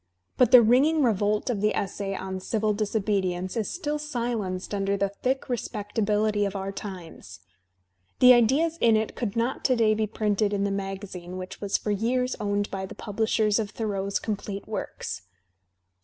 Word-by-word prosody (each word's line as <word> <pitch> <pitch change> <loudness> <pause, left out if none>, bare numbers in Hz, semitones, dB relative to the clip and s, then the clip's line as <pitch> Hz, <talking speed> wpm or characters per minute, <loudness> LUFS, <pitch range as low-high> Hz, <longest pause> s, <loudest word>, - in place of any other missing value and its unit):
But 250 -3 +4
the 245 -1 +9
ringing 280 +7 +4
revolt 210 0 +1
of 205 -4 -2
the 210 0 +2
essay 195 0 -3
on 190 0 -4
"Civil 215 +2 0
Disobedience" 195 -4 -1
is 225 -3 -1
still 300 -4 -3
silenced 235 -10 -3
under 200 0 0
the 200 0 +1
thick 255 +6 -1
respectabihty 210 -2 -1
of 200 - -6
our 195 0 -3
times. 180 - -9 0.8
The 250 0 +8
ideas 285 +8 +3
in 225 -2 +5
it 220 0 -2
could 225 -5 -3
not 235 +3 -1
to 255 - +4
day 225 -2 +3
be 215 0 0
printed 210 -1 0
in 200 -1 0
the 200 - 0
magazine 195 -2 -5
which 185 0 -8
was 200 -1 0
for 210 - -3
years 250 +5 0
owned 205 -1 -1
by 190 -1 -4
the - - -10
publishers 215 0 +1
of 215 -1 -4
TJioreau's 200 -3 -1
complete 200 -2 -4
works. 95 - -5
210 Hz, 170 wpm, -26 LUFS, 195-230 Hz, 0.8 s, the